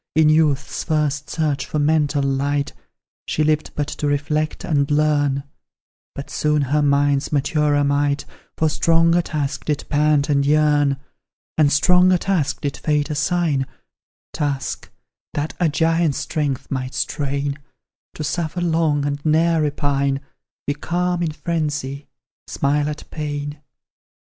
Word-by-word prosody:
In 155 -1 +5
youth's 150 -3 +2
first 150 -2 -1
search 150 -3 -1
for - - -3
mental 150 -1 +2
light, 140 +1 0 0.5
She 155 - 0
lived 155 0 +1
but 145 - 0
to 150 - -3
reflect 150 +2 -1
and 140 -2 +1
learn, 145 -2 +2 0.7
But 140 - -7
soon 150 -1 +1
her 145 +3 +1
mind's 140 -1 +2
maturer 145 0 +2
might 140 0 +1 0.3
For 160 - +2
stronger 165 +2 +3
task 150 -4 -3
did 150 -2 -1
pant 150 -1 +3
and 140 -1 +2
yearn; 145 -1 +3 0.6
And 150 -2 +4
stronger 180 +4 +5
task 175 -6 -1
did 140 -1 -3
fate 150 0 0
assign, 150 -3 0 0.7
Task 140 -2 -3 0.5
that 150 +1 -2
a 175 -3 +3
giant's 165 0 +1
strength 145 -5 -2
might 130 -1 -3
strain; 140 0 -2 0.6
To 155 - -4
suffer 165 +3 -2
long 160 -4 +1
and 145 0 -3
ne'er 160 +1 +3
repine, 140 -2 0 0.5
Be 145 - 0
calm 175 +4 -1
in 165 -2 0
frenzy, 150 -3 -3 0.4
smile 145 +1 0
at 150 - -7
pain. 145 -1 -4
150 Hz, 130 wpm, -21 LUFS, 145-155 Hz, 0.7 s, In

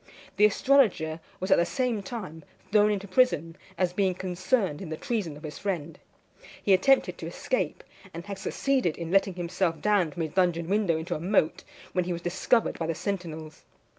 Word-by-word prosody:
The 210 - +7
astrologer 210 - +3 0.2
was 185 +1 -3
at - - +6
the - - +4
same 240 +3 -1
time 185 -6 -7 0.3
thrown 210 0 +5
into 200 -1 -2
prison, 175 - +2 0.2
as 180 -1 +1
being 190 -1 +1
concerned 185 - -1
in 185 - -6
the 160 - -4
treason 190 -11 -3
of 150 - -14
his 150 -2 -7
friend. 170 -6 -3 0.6
He 200 - +4
attempted 265 +9 +3
to - - -5
escape, - - -2 0.3
and 170 0 -8
had 200 -1 -6
succeeded 260 - 0
in 170 -1 -5
letting 195 -1 +3
himself 175 -1 -1
down 205 -5 +2
from 170 +1 -4
his 155 -1 -5
dungeon 175 -3 +1
window 200 -5 +2
into 165 +3 -3
a - - -3
moat, 175 -2 +1 0.3
when 180 -1 +1
he 180 - -2
was 170 0 -6
discovered 190 +6 +1
by 165 - -2
the 165 - -1
sentinels. 160 -5 -5
185 Hz, 190 wpm, -27 LUFS, 165-205 Hz, 0.6 s, The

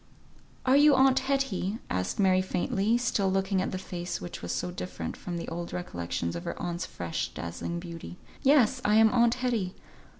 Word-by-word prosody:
"Are 260 +1 +5
you 290 0 +7
aunt 265 0 +5
Hetty?" 265 -7 -1
asked 90 0 -2
Mary, 185 -2 +4
faintly, 200 +4 +1
still 215 -5 +1
looking 195 0 +1
at - - -1
the 185 - -2
face 175 -1 -5
which 90 - -7
was 85 - -4
so 90 - -2
different 90 -2 -5
from 175 -1 -5
the 170 - -5
old 170 +1 -5
recollections 85 - -3
of 85 - -5
her - - -4
aunt's 175 0 -3
fresh 85 -2 -3
dazzling 85 - -4
beauty. 170 0 -8 0.2
"Yes! 260 -3 +4
I 210 - +3
am 220 0 +6
aunt 235 -1 +4
Hetty. 235 -8 -1
190 Hz, 180 wpm, -28 LUFS, 170-240 Hz, 0.2 s, you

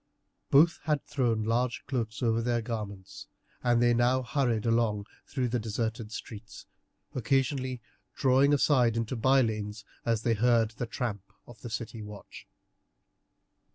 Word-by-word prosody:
Both 160 +5 +5
had 150 -3 0
thrown 115 -6 0
large 120 +2 0
dark - - -44
cloaks 115 -4 -3
over 115 -1 +2
their 120 0 0
garments, 105 -5 -6 0.4
and 120 -1 +3
they 120 0 +4
now 125 +2 +2
hurried 120 -5 0
along 115 -3 +1 0.2
through 130 -3 -1
the 120 +1 0
deserted 110 0 -3
streets, 110 -1 -9 0.5
occasionally 130 -1 0 0.3
drawing 135 +1 +4
aside 130 -5 +3
into 115 +2 -2
bylanes 110 -5 +1 0.2
as 115 -2 0
they 115 - +2
heard 115 0 +3
the 115 +2 -5
tramp 105 -4 -4
of 120 - -14
the 120 - -7
city 115 0 -5
watch. 105 -1 -11
115 Hz, 140 wpm, -29 LUFS, 110-130 Hz, 0.5 s, Both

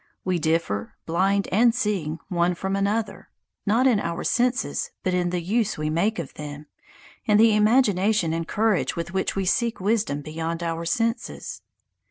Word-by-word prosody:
We 185 -2 +1
differ, 160 -11 -1
blind 195 +4 +1
and 230 +4 +4
seeing, 195 -10 -1
one 175 -1 +1
from 190 +2 -2
another, 205 +3 -1 0.4
not 230 +5 +3
in 240 -6 +4
our 170 -3 -3
senses, 250 +1 0
but 185 - 0
in 180 -1 +1
the 175 -1 -2
use 215 +4 0
we 155 0 -2
make 200 +8 +1
of 165 -6 -5
them, 150 0 -8 0.6
in 210 -1 +4
the 220 0 +6
imagination 210 -5 +3
and 165 0 -3
courage 215 -3 +1
with 170 +1 -5
which 190 - -1
we 195 -1 -1
seek 235 +4 +1
wisdom 200 -7 0
beyond 165 +2 -4
our 165 0 -3
senses. 230 +7 -2
190 Hz, 165 wpm, -24 LUFS, 165-220 Hz, 0.6 s, the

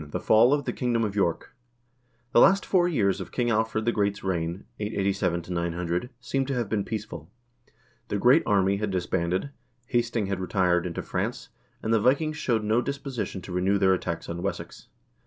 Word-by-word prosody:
The - - -3
Fall 110 +4 +5
of 145 -1 +1
the - - -2
Kingdom 120 -3 0
of 105 -2 -2
York 85 -5 -1 0.8
The - - +5
last 195 +8 +5
four 175 -2 +3
years 100 - +1
of 95 - -8
King 120 -2 0
Alfred 110 0 0
the 120 - +3
Great's 100 -2 -1
reign 85 -1 -2
(887 95 -4 -1
900) 85 +4 -2
seem 130 +2 -1
to 135 - -1
have 120 -3 -1
been 100 -1 -1
peaceful. 105 -8 -6 0.8
The 105 - -1
"Great 125 +9 +5
Army" 100 -1 +3
had 105 0 -2
disbanded, 90 +5 -1 0.3
Hasting 120 -2 0
had 100 -1 -2
retired 90 -2 +1
into 85 - -5
France, - - -3 0.3
and 110 - +1
the 110 - +3
Vikings 155 +6 +2
showed 115 -7 0
no 110 +3 +2
disposi 140 -2 -4
tion 95 - -7
to 90 - -9
renew 95 +3 +1
their 95 -1 +4
attacks 85 -2 -3
on 85 +1 -5
Wessex. 100 +2 -5
105 Hz, 185 wpm, -26 LUFS, 90-120 Hz, 0.8 s, Fall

